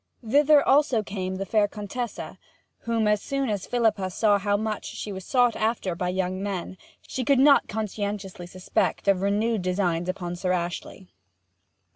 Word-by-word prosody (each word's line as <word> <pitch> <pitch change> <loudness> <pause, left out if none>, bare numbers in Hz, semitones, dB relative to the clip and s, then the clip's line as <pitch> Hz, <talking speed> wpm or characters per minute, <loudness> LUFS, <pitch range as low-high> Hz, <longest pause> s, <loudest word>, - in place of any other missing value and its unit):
Thither 290 +4 +5
also 270 -5 +4
came 190 -2 -4
the 195 +1 -4
fair 210 +1 +2
Contessa, 215 +3 -6 0.5
whom, 230 -2 +1
as 210 -1 +2
soon 275 -2 -2
as 205 -3 -3
Philippa 220 -6 +1
saw 205 +2 +2
how 205 +1 +1
much 215 0 -3
she 210 - -6
was 190 -1 -6
sought 245 +2 +2
after 215 -4 -1
by 180 +1 -2
younger 185 0 -2
men, 190 -2 -4 0.3
she 260 - -3
could 275 +3 +3
not 275 +2 +5
conscientiously 205 -4 -4
suspect 185 +2 -2
of 195 -2 +3
renewed 210 +2 +1
designs 180 -2 0
upon 175 -1 -3
Sir 180 +1 -1
Ashley. 175 +1 -4
205 Hz, 160 wpm, -25 LUFS, 185-225 Hz, 0.5 s, Thither